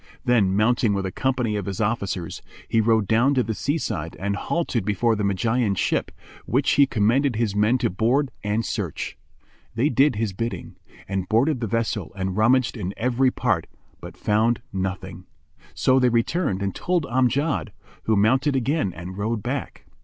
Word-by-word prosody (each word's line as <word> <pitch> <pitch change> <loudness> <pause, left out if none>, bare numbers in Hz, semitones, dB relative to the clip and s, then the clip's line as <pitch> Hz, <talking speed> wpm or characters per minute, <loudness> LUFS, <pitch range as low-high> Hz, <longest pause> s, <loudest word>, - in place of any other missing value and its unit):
Then, 105 -6 +3
mounting 110 -1 +2
with 100 -1 -2
a 95 - -3
company 125 -3 -1
of 100 - -4
his 95 -2 -4
officers, 100 -6 -2 0.3
he 115 - +2
rode 110 -2 +2
down 120 +7 +3
to 125 - +3
the 115 - -3
sea 145 +8 -1
side 80 - -4
and 100 +1 -1
halted 130 - -1
before 105 +3 +1
the 105 - -2
Magian's 100 +2 +1
ship, - - 0 0.4
which 135 +3 +2
he 140 -1 +5
commended 120 +3 +2
his 110 -3 -1
men 105 +5 +3
to 120 -2 0
board 125 +8 +1
and 105 +2 0
search. - - -4 0.6
They 125 +7 +2
did 135 0 +3
his 105 -2 -2
bidding, 115 +5 -5 0.3
and 95 -1 -3
boarded 125 +6 +2
the 115 - -2
vessel 110 -3 -2
and 95 -1 -3
rummaged 115 +3 +3
in 100 -3 -4
every 125 +2 +2
part, 105 -10 -1 0.3
but - - -10
found 115 +3 +1
nothing; 95 -1 -4 0.5
so 130 0 +3
they 125 -1 +4
returned 115 - 0
and 95 -1 -1
told 175 -4 -1
Amjad, 130 - 0 0.3
who 110 - +2
mounted 130 +8 +3
again 135 - 0
and 90 +3 -8
rode 110 0 -2
back. - - -4
115 Hz, 175 wpm, -23 LUFS, 100-130 Hz, 0.6 s, he